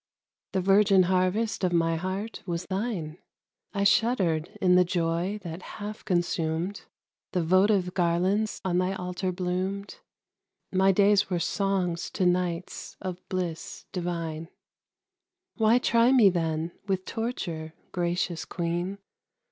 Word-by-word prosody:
The 190 - +1
virgin 195 0 +5
harvest 185 +5 +1
of 180 - +2
my 165 -1 +2
heart 190 +6 -4
was 170 0 -2
thine, 190 -6 -3 0.5
I 200 -1 -1
shuddered 195 -8 +2
in 180 -2 +4
the 180 0 +6
joy 175 +3 -1
that 170 0 -6
half 210 +2 -7
consumed; 175 0 -1 0.5
The 180 - +1
votive 185 +1 +3
garlands 185 +4 +1
on 180 -1 +2
thy 185 +1 0
altar 180 0 -3
bloomed, 185 +2 -3 0.7
My 190 +1 +4
days 200 +1 +4
were 180 - 0
songs 180 -1 -1
to 185 - +2
nights 180 0 -1
of 185 -2 -5
bliss 175 -3 -4
divine. 165 -2 -3 1.1
Why 225 +1 +5
try 235 0 +4
me, 230 -7 +6
then, 165 -1 -1 0.2
with 190 -1 -1
torture, 170 -9 -4 0.2
gracious 175 -1 -1
Queen? 175 +2 -3
185 Hz, 125 wpm, -27 LUFS, 170-200 Hz, 1.1 s, the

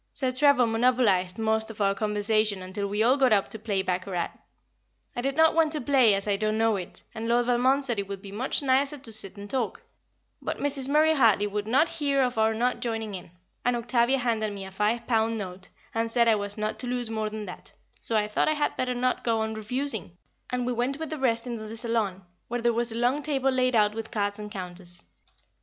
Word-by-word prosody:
Sir 260 -2 0
Trevor 265 -1 +4
monopolised 225 -6 +2
most 220 0 +1
of 225 - -9
the 195 -1 +2
conversation, 210 -1 0
until 200 +2 -4
we 205 +2 0
all 255 +4 +4
got 260 -3 +3
up 200 -2 +3
to 220 - -2
play 200 -3 -1
baccarat. 185 -1 -2 0.8
I 245 - -2
did 270 +2 -1
not 320 0 +5
want 320 -2 +3
to 305 - -1
play 250 -5 +4
as 195 +1 -3
I 200 -1 +1
don't 215 +1 0
know 225 -1 +2
it, 180 -3 -7
and 225 0 -5
Lord 240 +1 +2
Valmond 255 +3 +2
said 240 -5 -1
it 200 - -3
would 200 -1 -5
be 200 - -9
much 250 +7 -2
nicer 275 +2 +2
to 255 -4 -8
sit 210 -2 -4
and 200 0 -8
talk, 240 -1 -2 0.6
but - - -3
Mrs. 275 -2 0
Murray 310 +2 +4
Hartley 225 -8 +4
would 205 0 -3
not 270 +8 +3
hear 280 -4 0
of 245 -3 -1
our 220 0 +3
not 245 +3 0
joining 225 -3 -3
in; 180 -3 -8 0.3
and 245 0 +2
Octavia 240 +2 +2
handed 225 -4 -1
me 195 -1 -6
a 190 - -9
five 215 +4 0
pound 225 -1 +1
note 185 -2 -7 0.2
and 225 0 -1
said 235 0 +3
I 225 - +6
was 205 -1 -2
not 215 0 -3
to 250 - 0
lose 245 -2 -3
more 220 -1 -2
than 215 0 -6
that, 180 - -10 0.3
so 225 - +5
I 210 0 +1
thought 210 - 0
I 310 - +3
had 295 -1 -1
better 250 -1 -1
not 250 +1 0
go 225 -2 +1
on 220 0 -2
refusing, 220 -4 -3 0.3
and 250 -1 -1
we 250 - -1
went 245 +4 -1
with 320 -1 -5
the 310 - -4
rest 230 -3 +1
into 230 -3 -5
the 225 +1 -6
saloon, 220 -5 -1 0.2
where 240 +1 -2
there 235 0 +2
was 235 0 -1
a 225 - -5
long 250 +5 +1
table 270 -3 0
laid 255 -1 +1
out 210 -1 +3
with 225 0 -6
cards 205 -2 -2
and 210 0 -6
counters. 180 -3 -8
225 Hz, 235 wpm, -27 LUFS, 210-255 Hz, 0.8 s, I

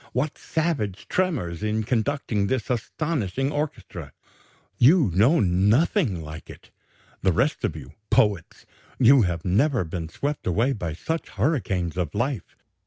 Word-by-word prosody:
What 140 +5 -1
savage 115 - -2
tremors 130 - -1
in 105 +1 -1
conducting 115 -3 0
this 130 -1 -1
astonishing 135 - -2
orchestra! 150 0 -5 0.7
You 140 - +5
know 120 - +4
nothing 100 - +2
like 75 +1 -9
it, - - -13 0.5
the 95 - +3
rest 135 - 0
of 80 - -1
you, 70 -5 -10 0.2
poets; 100 -6 +1 0.3
you 130 +1 +6
have 85 -4 -1
never 115 +6 +2
been 80 -1 -5
swept 145 - -4
away 115 +10 +2
by 85 -8 -4
such 160 - -4
hurricanes 95 - -1
of 85 -5 -2
life. 125 - -2
110 Hz, 135 wpm, -24 LUFS, 90-145 Hz, 0.7 s, you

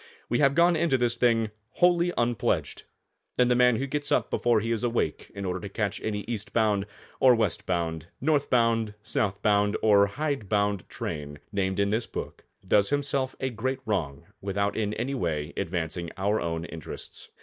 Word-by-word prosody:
We 120 - +1
have 140 -1 +4
gone 170 +1 +5
into 160 -4 +2
this 120 -1 +1
thing 115 -3 +2 0.2
wholly 175 0 +3
unpledged, 120 -1 0 0.5
and 125 0 +4
the - - +4
man 125 -1 +5
who 135 - -1
gets 145 +1 -3
up - - +2
before 120 -2 +3
he 115 +2 -2
is 115 -1 -1
awake, 120 -1 -1
in 100 -1 -4
order 90 0 -2
to 100 - -7
catch 100 0 -2
any 105 -1 -2
East 105 -2 -5
bound, 105 -3 +2 0.3
or 130 -2 +7
West 115 - -1
bound, 80 -2 -2
North 145 0 +1
bound, 115 -3 +2
South 100 -3 -1
bound, 105 0 +3
or 100 -2 +6
hide 135 -2 -3
bound 100 -3 0
train, 75 -1 -5
named 95 -2 -1
in 100 0 +2
this 110 +2 0
book, - - -7 0.2
does 100 -1 +3
himself 140 -2 0
a 130 -1 -1
great 130 +3 -2
wrong 85 -8 -2 0.2
without 100 +1 -1
in 105 -1 -1
any 125 +4 -2
way 80 - -2
advancing 85 -2 -3
our 100 +3 +1
own 80 -1 -2
interests. 80 -2 -9
110 Hz, 180 wpm, -27 LUFS, 100-125 Hz, 0.5 s, or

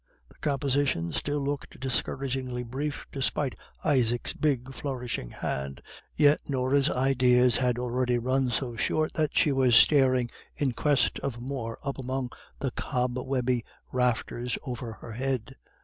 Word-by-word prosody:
The - - -20
composition 140 - 0
still 145 0 -1
looked 140 0 -4
discouragingly 130 -1 -1
brief, 140 +5 -4
despite 135 0 0 0.3
Isaac's 120 -5 +2
big, 135 -4 0
flourishing 125 - -4
hand, 70 +1 -4 0.4
yet 145 0 +5
Norah's 135 +1 +2
ideas 125 -1 +4
had 125 -2 +1
already 125 0 0
run 130 +2 +1
so 120 0 -1
short 155 +7 0
that 155 -2 0
she 150 - +5
was 130 -3 +4
staring 130 -3 +5 0.2
in 140 -3 0
quest 140 +2 +2
of 130 -4 -4
more 120 -3 -4
up 140 0 -3
among 130 -1 -3 0.3
the 135 - -2
cobwebby 125 -1 -1 0.3
rafters 125 -1 0
over 120 -3 -5
her 115 - -10
head. 130 +1 -2
130 Hz, 135 wpm, -28 LUFS, 120-135 Hz, 0.4 s, yet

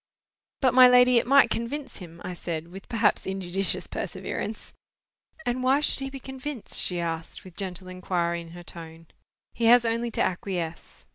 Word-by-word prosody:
"But, 260 -3 +3
my 255 0 +9
lady, 250 -1 +6
it - - -4
might 275 -3 +6
convince 265 +5 -3
him," 170 -2 -11
I 180 - -4
said, 170 -2 -5
with 195 +2 -11
perhaps 225 -2 +1
injudicious 190 0 -1
perseverance. 220 - -5 0.7
"And 245 +1 -1
why 260 +2 +3
should 300 - 0
he 270 0 -3
be 270 0 -8
convinced?" 265 -1 -3
she 180 -1 +1
asked, 165 -1 -4
with 185 -2 -13
gentle 185 -1 -5
inquiry 175 -2 -2
in 165 - -11
her 175 - -10
tone. 165 -1 -11 0.4
"He 235 - -1
has 240 +1 +7
only 230 +1 0
to - - -2
acquiesce. 175 -3 -4
195 Hz, 170 wpm, -26 LUFS, 175-250 Hz, 0.7 s, my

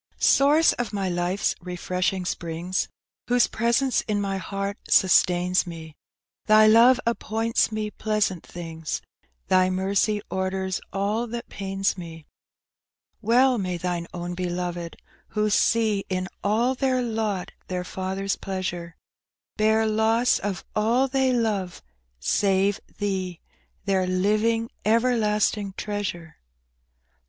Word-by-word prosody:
Source 295 +4 +5
of 245 -2 -3
my 195 -2 -1
life's 175 +2 0
refreshing 180 +1 -2
springs, 175 +2 -2 0.4
Whose 245 -1 +4
presence 235 +3 +1
in 210 -2 0
mj 195 -1 -2
heart 195 +2 -4
sustains 180 -1 +4
me, 160 -2 -9 0.5
Thy 215 0 +7
love 235 +4 +6
appoints 230 -1 0
me 215 -1 -3
pleasant 210 -6 -1
things, 165 -2 -6 0.4
Thy 185 0 +4
mercy 195 +3 +1
orders 190 0 -2
all 205 +5 -1
that 235 +1 -6
pains 195 0 -2
me. 165 -2 -9 1.0
Well 245 +3 +4
may 180 -2 -2
Thine 175 -1 -3
own 175 0 -5
beloved, 175 -1 -4 0.3
who 210 0 0
see 215 -2 +2
In 185 0 -1 0.2
all 230 +5 +2
their 260 -1 0
lot 220 -5 -2 0.2
their 180 -1 -3
Father's 190 +2 -3
pleasure, 180 -3 -5 0.6
Bear 220 +1 +3
loss 220 +3 +2
of 195 -2 -4
all 235 +5 +2
they 265 -1 +1
love, 210 -7 -1 0.4
save 195 - +1 0.2
Thee 190 -4 -2 0.2
— - - -41
Their 190 -2 +1
living, 215 +5 +1
everlasting 215 -3 +1
treasure. 195 -6 -4
200 Hz, 115 wpm, -25 LUFS, 185-220 Hz, 1.0 s, Thy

